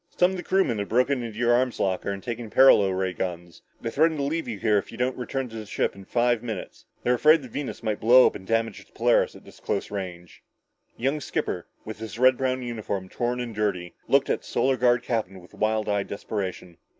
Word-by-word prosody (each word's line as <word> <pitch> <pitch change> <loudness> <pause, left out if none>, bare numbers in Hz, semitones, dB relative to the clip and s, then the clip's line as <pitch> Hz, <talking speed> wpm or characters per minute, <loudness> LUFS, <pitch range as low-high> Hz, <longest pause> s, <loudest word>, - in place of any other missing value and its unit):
Some 180 +1 +4
of 190 - -4
the - - -4
crewmen 180 - +1
have 100 - -3
broken 125 +3 +2
into 115 -3 -6
your 120 0 +3
arms 125 0 +1
locker 95 0 0
and 100 -1 -4
taken 120 -1 -5
paralo 105 -6 +6
ray 95 0 -1
guns. 85 -1 -5 0.2
They 115 - -4
threaten 160 +3 +2
to 140 - -1
leave 160 +4 -2
you 115 - -4
here 105 0 +2
if - - -9
you 115 - -10
don't 125 +1 0
return 130 +1 -3
to 115 - -11
the 110 -1 -6
ship - - 0
within 100 0 -13
five 120 0 +1
minutes. 110 -6 -7 0.2
They're 125 - +3
afraid 155 +4 +5
the - - -8
Venus 130 +1 -5
might 110 -2 -1
blow 125 +3 +7
up - - +3
and 95 - -10
damage 115 -1 -1
the - - -30
Polaris - - +2
at - - -14
this - - -15
close - - -3
range." 90 -4 -7 0.6
The - - -13
young 140 +3 +1
skipper, - - -3 0.2
his 110 0 -7
red 130 +1 +5
brown 130 0 -1
uniform 105 -5 -4
torn 120 +3 -2
and 120 -2 -4
dirty, 100 -5 -2
looked - - +3
at - - 0
the - - -16
Solar 135 0 +1
Guard 120 -1 +3
captain 100 -5 -2
with 90 - -17
wild 110 0 0
eyed 100 -1 0
desperation. 95 -4 -5
115 Hz, 235 wpm, -25 LUFS, 100-125 Hz, 0.6 s, blow